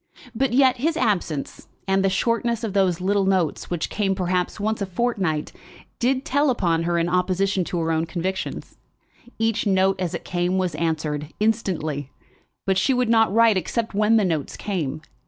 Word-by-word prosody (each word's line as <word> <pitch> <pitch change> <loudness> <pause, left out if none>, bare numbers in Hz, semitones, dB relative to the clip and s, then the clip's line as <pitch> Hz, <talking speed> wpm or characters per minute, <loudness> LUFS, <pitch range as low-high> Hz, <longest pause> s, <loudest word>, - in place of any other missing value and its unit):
But 265 +3 0
yet 260 0 +4
his 315 +6 0
absence, 185 - -1 0.2
and 195 0 +2
the 195 - +3
shortness 230 +3 0
of 215 -4 -3
those 185 -4 +2
little 195 +1 +1
notes, 185 -5 0
which 175 -2 -2
came 195 -2 0
perhaps 180 +1 -1
once 215 +1 -1
a 200 - -1
fortnight, 185 -7 -1 0.5
did 260 +2 +1
tell 285 +2 +2
upon 170 -9 +1
her 170 0 +1
in 170 0 +1
opposition 185 +2 +1
to 180 - -3
her 165 -1 0
own 160 +1 0
convictions. 185 +3 -4 0.6
Each 225 -1 0
note 190 -1 +2
as 175 -3 -2
it - - -7
came 180 +1 0
was 185 -3 0
answered, 150 -2 -2
instantly; 170 - -1 0.6
but 190 -1 +2
she 260 +7 +2
would 250 -2 +1
not 225 -3 +4
write 225 -1 +5
except 225 +4 -2
when 210 +2 +3
the 210 - +3
notes 160 -5 -2
came. 155 -7 -3
190 Hz, 175 wpm, -23 LUFS, 175-225 Hz, 0.6 s, write